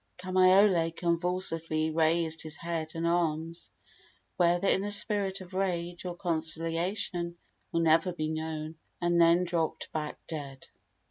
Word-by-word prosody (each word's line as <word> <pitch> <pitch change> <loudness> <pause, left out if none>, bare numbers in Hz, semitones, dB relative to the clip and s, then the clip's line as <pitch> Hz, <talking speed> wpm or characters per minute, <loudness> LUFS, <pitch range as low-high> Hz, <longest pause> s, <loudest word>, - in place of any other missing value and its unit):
Kamaiole 185 -1 +4
convulsively 170 -2 0
raised 160 0 +1
his 155 0 -3
head 165 -2 -4
and 165 0 -2
arms 165 -1 -1 0.7
whether 175 +2 +2
in 190 - +2
a 205 - -2
spirit 200 -1 +2
of 185 0 -12
rage 175 -2 -2
or 175 -1 -4
conciliation 170 +1 -2 0.3
will 165 - +1
never 165 +2 +3
be 155 -3 -3
known 155 0 -4 0.2
and 175 -1 +2
then 170 +2 +5
dropped 170 -2 -2
back 150 -1 -4
dead. 140 -4 -7
170 Hz, 130 wpm, -29 LUFS, 160-180 Hz, 0.7 s, then